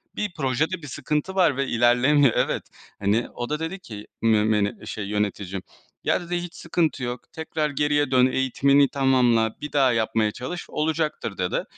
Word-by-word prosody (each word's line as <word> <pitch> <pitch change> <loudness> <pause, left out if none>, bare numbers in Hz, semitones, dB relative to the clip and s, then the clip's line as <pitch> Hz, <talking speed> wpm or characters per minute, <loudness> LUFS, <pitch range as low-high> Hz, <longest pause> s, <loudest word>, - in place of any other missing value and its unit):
bir 205 -4 -3
projede 160 +4 -1
bir 150 - -9
sıkıntı 150 +7 -2
var 170 -8 +3
ve 140 - 0
ilerlemiyor. 125 +3 +4
Evet. - - 0 0.4
hani 105 +4 +1
o 120 +2 -5
da 150 +1 -1
dedi 170 +4 -4
ki 105 - -10
mü 105 -2 +1
şey, 105 -2 -4
yöneticim 100 -2 -2 0.4
"ya" - - +1
dedi 175 0 -4
"Hiç 175 -1 -8
sıkıntı 160 -5 -1
yok, 120 0 -3
tekrar 160 -1 -2
geriye 145 -1 +1
dön, 125 -1 +5
eğitimini 135 +2 +3
tamamla, 125 -5 +2
bir 150 - -5
daha 135 -3 +4
yapmaya 110 -1 +1
çalış, 130 +11 -6
olacaktır." 155 -8 -2
dedi. 90 -1 -1
130 Hz, 165 wpm, -24 LUFS, 115-150 Hz, 0.4 s, dön